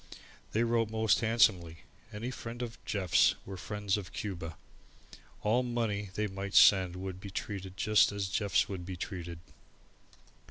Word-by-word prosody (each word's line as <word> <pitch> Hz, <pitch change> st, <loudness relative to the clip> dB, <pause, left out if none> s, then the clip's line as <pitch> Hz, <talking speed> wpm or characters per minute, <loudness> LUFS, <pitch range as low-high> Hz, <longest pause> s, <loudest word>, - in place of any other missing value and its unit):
They 110 Hz, -, +2 dB
wrote 115 Hz, -2 st, +1 dB
most 110 Hz, -1 st, +2 dB
handsomely. 95 Hz, -8 st, +2 dB, 0.3 s
Any 115 Hz, +4 st, -4 dB
friends 120 Hz, 0 st, -6 dB
of 115 Hz, -1 st, -8 dB
Jeff's 95 Hz, -4 st, +3 dB
were 95 Hz, -, -7 dB
friends 105 Hz, +1 st, -2 dB
of 100 Hz, -3 st, -7 dB
Cuba. 85 Hz, -6 st, -5 dB, 0.9 s
All 110 Hz, +4 st, +3 dB
money 115 Hz, -5 st, -2 dB
they 105 Hz, -, 0 dB
might 100 Hz, 0 st, -5 dB
send 95 Hz, -3 st, +6 dB
would 95 Hz, 0 st, -6 dB
be 100 Hz, -, -8 dB
treated 95 Hz, -1 st, -5 dB
just 105 Hz, 0 st, +4 dB
as 100 Hz, -1 st, -2 dB
Jeff's 100 Hz, -1 st, +1 dB
would 95 Hz, -3 st, -5 dB
be 95 Hz, +1 st, -6 dB
treated. 85 Hz, -2 st, -6 dB
100 Hz, 150 wpm, -31 LUFS, 95-110 Hz, 0.9 s, send